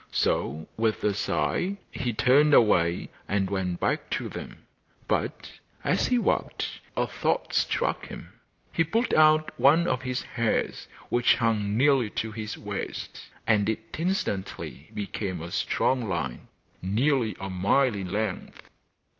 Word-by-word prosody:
So 80 +4 0
with 110 -1 0
a 105 - +2
sigh 100 - 0
he 125 -2 -2
turned 140 +7 +5
away 85 -6 +3 0.2
and 95 -1 0
went 90 -3 -1
back - - -1
to - - -5
them, - - -9 0.4
but, - - -2 0.3
as - - +2
he 250 - +3
walked, 240 - -1 0.2
a - - +2
thought - - -1
struck - - 0
him. - - -10 0.4
He 165 - +3
pulled 225 +10 0
out 155 0 +5
one 160 +5 +5
of 130 -6 0
his 125 0 -2
hairs 115 -2 -1 0.2
which 120 0 +4
hung 110 -3 0
nearly 135 -3 +4
to 110 - -1
his 110 -1 -5
waist, 100 -1 -6 0.2
and 105 -2 +3
it 110 0 -4
instantly 165 - -3
became 100 -2 -3
a 85 +2 -7
strong 125 +3 0
line, 75 -9 -3 0.3
nearly 115 +2 +1
a 95 0 -5
mile 105 +8 +3
in 95 -3 -5
length. 105 -2 -4
110 Hz, 140 wpm, -27 LUFS, 95-135 Hz, 0.4 s, turned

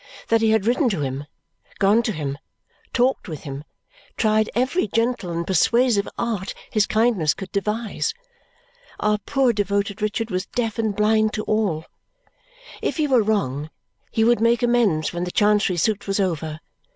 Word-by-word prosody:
That 225 0 +3
he 225 - +3
had 220 -2 +2
written 250 +3 +2
to 190 -8 -2
him, 135 +1 -3 0.5
gone 205 +4 +4
to 230 - -1
him, 145 -5 -4 0.5
talked 255 +2 +1
with 155 -5 -6
him, 140 -1 -6 0.5
tried 215 -1 +2
every 260 +6 +1
gentle 230 -2 0
and 170 0 -2
persuasive 215 +3 +3
art 215 -5 -2 0.2
his 215 -3 +2
kindness 215 -9 +2
could 190 -1 -8
devise. 210 - -1 0.9
Our 210 0 +1
poor 265 +2 +1
devoted 200 0 -1
Richard 215 +1 -1
was 185 +1 -2
deaf 230 -3 -2
and 220 -3 0
blind 215 +1 +2
to 215 - -2
all. 200 -8 0 1.0
If - - -2
he 310 - +2
were 260 -5 +4
wrong, 155 -9 -1 0.4
he 220 - +1
would 235 0 +3
make 235 +1 +3
amends 225 -11 +2
when 175 0 -2
the 180 - -3
Chancery 205 -1 +2
suit 210 +5 0
was 195 +1 0
over. 160 -4 -2
210 Hz, 165 wpm, -22 LUFS, 185-230 Hz, 1.0 s, gone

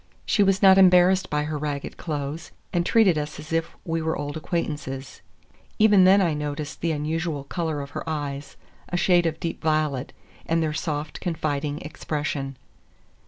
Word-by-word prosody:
She 205 - +2
was 195 -1 +3
not 190 0 +8
embarrassed 185 0 +5
by 150 0 0
her 150 0 -3
ragged 145 -1 -4
clothes, 150 0 -4 0.2
and 175 -1 +2
treated 190 -5 +4
us 150 0 -5
as 155 +2 -8
if 165 0 -1
we 165 -1 -1
were 160 0 -1
old 145 0 -4
acquaintances. 145 -5 -4 0.6
Even 210 -3 +6
then 195 +2 +6
I 170 -4 +2
noticed 150 0 -4
the 170 - 0
unusual 155 0 -2
color 160 0 -3
of 140 0 -8
her - - -5
eyes—a 145 +3 -6
shade 175 -1 +3
of 160 0 -3
deep 165 - -4
violet—and 155 +1 -2
their 155 -1 -1
soft, 150 -1 -3
confiding 150 -3 -2
expression. 145 -2 -4
155 Hz, 160 wpm, -25 LUFS, 145-175 Hz, 0.6 s, not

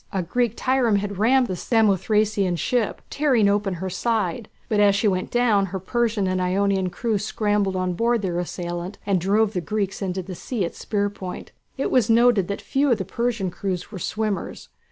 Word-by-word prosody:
A 190 -2 -1
Greek 235 +5 -1
trireme 255 -4 +2
had 200 -1 -4
rammed 255 +4 +4
the 185 - -3
Samothracian 210 -2 +2
ship, 240 +2 -1
tearing 260 -8 +3
open 200 -2 +1
her 185 +2 -4
side; 215 0 -1 0.2
but 210 - +1
as 205 -1 +5
she 205 +2 +2
went 185 -2 0
down 225 -5 +2
her 190 +1 -4
Persian 225 +1 0
and 185 0 0
Ionian 190 0 +1
crew 220 +2 -1
scrambled 205 -2 0
on 185 -1 -1
board 230 +3 +1
their 175 -2 -1
assailant 175 +2 -5
and 195 -3 +1
drove 210 +3 +2
the 180 - -1
Greeks 200 0 -2
into 190 -1 -2
the 185 +1 -7
sea 205 +2 -3
at 170 - -4
the - - -14
spear 205 -1 -1
point. 185 -3 -8 0.3
It 270 - -1
was 245 -3 +3
noted 230 -4 +4
that 200 - -4
few 280 +1 +1
of 235 - +3
the 190 - -4
Persian 230 -2 -2
crews 185 0 -4
were 195 - -6
swimmers. 210 +2 -3
200 Hz, 195 wpm, -23 LUFS, 185-225 Hz, 0.3 s, as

